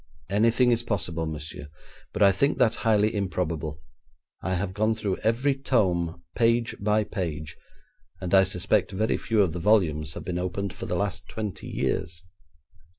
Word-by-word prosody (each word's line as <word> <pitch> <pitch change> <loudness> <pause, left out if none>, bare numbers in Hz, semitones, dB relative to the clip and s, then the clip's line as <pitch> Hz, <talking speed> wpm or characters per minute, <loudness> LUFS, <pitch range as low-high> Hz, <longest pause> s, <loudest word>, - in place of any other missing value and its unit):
'Anything 115 +4 +4
is 120 -1 +2
possible, 85 -8 -2
monsieur, 75 -1 -6 0.4
but - - +1
I 100 - +7
think 140 +10 +1
that 110 - +4
highly 110 -1 +2
improbable. 85 -6 -2 0.6
I 95 +1 -1
have 95 +1 -2
gone 110 +2 +1
through 105 -4 -2
every 125 +6 +1
tome, 90 -11 0
page 115 0 +2
by 105 +1 +2
page, 80 -7 -4 0.6
and 90 -1 -4
I 95 -1 +8
suspect 90 0 +1
very 110 +3 +1
few 110 -3 +2
of 85 -5 -1
the 90 - -4
volumes 80 -6 +2
have - - -7
been 90 -1 -2
opened 90 +1 -3
for - - -7
the - - -1
last 100 +1 -2
twenty 105 -8 -5
years.' 85 0 -2
95 Hz, 160 wpm, -26 LUFS, 85-110 Hz, 0.6 s, I